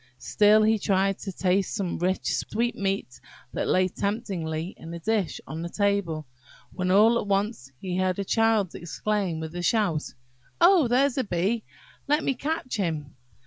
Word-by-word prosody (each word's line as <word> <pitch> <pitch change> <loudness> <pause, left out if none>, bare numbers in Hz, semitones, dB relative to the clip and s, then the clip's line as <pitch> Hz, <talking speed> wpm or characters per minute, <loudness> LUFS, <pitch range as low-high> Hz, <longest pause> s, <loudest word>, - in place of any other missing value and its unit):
Still 210 - +4
he 220 0 +3
tried 195 0 +1
to 195 - -5
taste 185 +1 0
some 185 -4 -2
rich 185 +2 0
sweetmeats 200 - -2 0.3
that - - -2
lay 185 0 +3
temptingly 185 -5 -3
in 165 - -10
a - - -6
dish 210 -1 -1
on 160 +1 -6
the 170 - -4
table, 200 -6 0 0.5
when 185 -1 -2
all 220 +5 +5
at - - -5
once 200 - -1
he 180 -1 -3
heard 185 -1 +1
a 200 - -2
child 225 -4 +2
exclaim 185 0 -2
with 160 0 -6
a 175 - -4
shout, 175 -5 0 0.4
"Oh, 345 -5 +6
there's 265 +3 +2
a - - +2
bee, 205 +3 -1 0.4
let 295 +2 +2
me 275 - +1
catch 285 -1 -3
him!" 160 -7 -3
195 Hz, 165 wpm, -26 LUFS, 175-220 Hz, 0.5 s, Oh